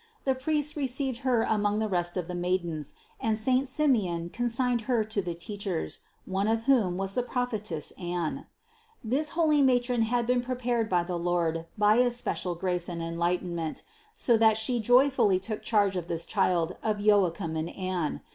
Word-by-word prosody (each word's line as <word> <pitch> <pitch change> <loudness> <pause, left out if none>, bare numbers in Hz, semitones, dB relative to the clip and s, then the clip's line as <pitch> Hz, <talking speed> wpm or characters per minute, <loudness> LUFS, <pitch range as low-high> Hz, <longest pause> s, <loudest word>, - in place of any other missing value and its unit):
The 265 - +2
priests 295 +3 -1
received 265 -3 -1
Her 250 -4 +2
among 210 -1 +1
the 220 0 0
rest 175 -2 -1
of 180 -2 -2
the 180 - -5
maidens, 175 -4 -2 0.2
and 220 -4 0
saint 255 +4 +1
Simeon 205 - +1
con 240 0 -1
signed 245 0 +1
Her 235 -3 +3
to 215 -1 -2
the 175 -2 -4
teachers, 200 -1 -4 0.3
one 195 +2 -1
of 225 0 +1
whom 225 -9 +3
was 195 0 -2
the 250 - +1
prophetess 215 - -3
Anne. 175 -3 -3 0.6
This 275 +7 0
holy 305 -3 +4
matron 245 -2 +2
had 235 +1 +1
been 250 +1 +2
prepared 245 -2 -1
by 175 -2 +2
the 175 0 -3
Lord 170 -1 -1
by 210 +1 +4
especial 245 -7 0
grace 180 0 -1
and 170 -1 -4
enlightenment, 170 -1 -2 0.3
so 235 -2 +3
that 220 -1 +4
She 235 +2 0
joyfully 245 -3 +4
took 215 +3 -5
charge 205 -3 +2
of 175 -2 -3
this 165 -1 -3
Child 180 -4 0
of 215 -1 -1
Joachim 195 -5 +2
and 160 +1 -2
Anne. 185 -5 -3
210 Hz, 175 wpm, -28 LUFS, 175-245 Hz, 0.6 s, holy